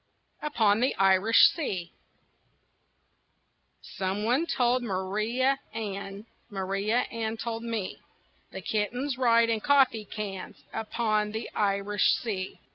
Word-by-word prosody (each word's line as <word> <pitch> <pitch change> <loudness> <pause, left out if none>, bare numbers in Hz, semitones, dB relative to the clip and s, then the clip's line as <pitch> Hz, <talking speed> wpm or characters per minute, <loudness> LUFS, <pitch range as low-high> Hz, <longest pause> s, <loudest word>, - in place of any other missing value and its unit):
UPON 220 -9 +2
THE 255 +2 +1
IRISH 195 +3 +5
SEA 190 - -4 1.9
Some 190 +2 -3
one 255 +9 +1
told 250 -3 +2
Maria 220 +6 0 0.2
Ann, 200 -1 -5 0.2
Maria 200 +4 0
Ann 225 -1 -3
told 230 0 -4
me, 230 -5 -4 0.5
That 190 - -8
kittens 245 +6 -1
ride 230 -2 +4
in 225 - 0
coffee 260 -4 +3
cans 200 -2 -7
Upon 215 -1 -1
the 220 - -5
Irish 200 0 +2
Sea. 195 -5 -4
220 Hz, 110 wpm, -28 LUFS, 200-235 Hz, 1.9 s, IRISH